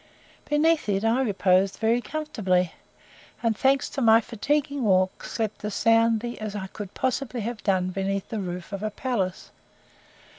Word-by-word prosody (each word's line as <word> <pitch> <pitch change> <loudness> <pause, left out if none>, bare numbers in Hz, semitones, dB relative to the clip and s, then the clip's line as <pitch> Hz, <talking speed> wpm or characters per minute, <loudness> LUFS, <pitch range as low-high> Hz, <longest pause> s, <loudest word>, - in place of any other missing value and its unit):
Beneath 305 -3 +2
it 200 +2 0
I 230 +4 +3
reposed 195 -4 +2
very 230 +2 +2
comfortably; 210 - -1 0.7
and, 230 -1 +2
thanks 270 +5 +2
to 275 - -4
my 225 -1 +7
fatiguing 280 +5 -1
walk, 185 -3 +2
slept 220 -3 -3
as 210 -1 -3
soundly 230 +1 +2
as 215 -1 -5
I 195 -2 -4
could 200 0 -8
possibly 255 -1 -1
have 225 0 -4
done 185 -2 +1
beneath 195 +1 -2
the 220 - -3
roof 180 -1 -5
of 200 - -4
a 215 - -1
palace. 205 -5 -3
220 Hz, 155 wpm, -25 LUFS, 195-245 Hz, 0.7 s, my